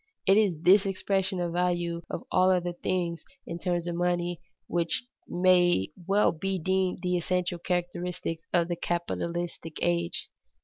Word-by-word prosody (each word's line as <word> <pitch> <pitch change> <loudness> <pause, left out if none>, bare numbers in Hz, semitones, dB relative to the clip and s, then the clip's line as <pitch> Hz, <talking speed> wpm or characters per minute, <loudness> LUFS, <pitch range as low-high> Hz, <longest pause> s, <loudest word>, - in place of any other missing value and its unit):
It 195 - +6
is 190 -7 +2
this 195 +2 +6
expression 190 0 0
of 175 -1 -1
the 175 - -1
value 175 -1 0
of - - -4
all 185 0 +4
other 180 -1 +1
things 175 -1 -2 0.2
in 170 - -5
terms 175 -1 -1
of 175 - -2
money 175 0 0 0.2
which 170 +3 -1 0.2
may 175 - +3 0.2
well 200 +2 +4
be 190 +4 -2
deemed 185 +1 0
the 180 0 +1
essential 175 0 -1
characteristic 175 -1 -2
of 170 -1 +3
the 175 - -1
capitalistic 170 -1 -3
age. 85 -1 0
175 Hz, 150 wpm, -28 LUFS, 170-185 Hz, 0.2 s, It